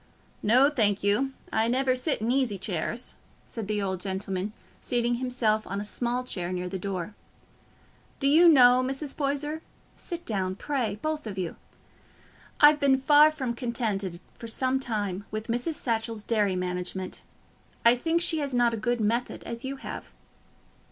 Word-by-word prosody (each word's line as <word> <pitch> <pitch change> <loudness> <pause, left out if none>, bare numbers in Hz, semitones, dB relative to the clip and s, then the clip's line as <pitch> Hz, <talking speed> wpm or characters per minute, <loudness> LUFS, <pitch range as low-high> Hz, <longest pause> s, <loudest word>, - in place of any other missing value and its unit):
"No, 250 +6 +5
thank 205 -8 +2
you, 210 +7 +2 0.2
I 220 +1 +2
never 255 +1 +2
sit 255 -1 0
in 225 +2 0
easy 255 -6 +1
chairs," 195 +5 -2 0.3
said 225 -4 -6
the 210 -1 -1
old 190 -2 -2
gentleman, 190 0 -3 0.3
seating 240 -1 +1
himself 225 -4 +1
on 200 +1 -3
a 205 - -3
small 245 +3 -1
chair 180 -7 -4
near 180 0 -3
the 190 +1 -4
door. 190 0 -4 1.1
"Do 275 - +2
you 330 +5 +7
know, 250 -4 +7
Mrs. 270 +2 -3
Poyser—sit 300 +4 -5
down, 190 -4 -2
pray, 240 -3 -2
both 310 -4 -2
of 200 -2 -6
you—I've 295 - -1
been 275 -2 +4
far 295 +3 +6
from 265 -6 -3
contented, 215 -7 -3
for 230 - -9
some 260 +3 +1
time, 205 -6 -3
with 215 +2 -5
Mrs. 245 +8 -1
Satchell's 225 -4 -2
dairy 210 -5 +1
management. 180 +1 -3 0.6
I 235 +1 +7
think 330 +7 0
she 325 -2 +2
has 280 -3 -2
not 240 -1 +3
a - - -2
good 240 +2 -1
method, 230 +4 -1
as 235 0 -6
you 270 +1 -3
have." 270 - -8
235 Hz, 160 wpm, -27 LUFS, 205-270 Hz, 1.1 s, you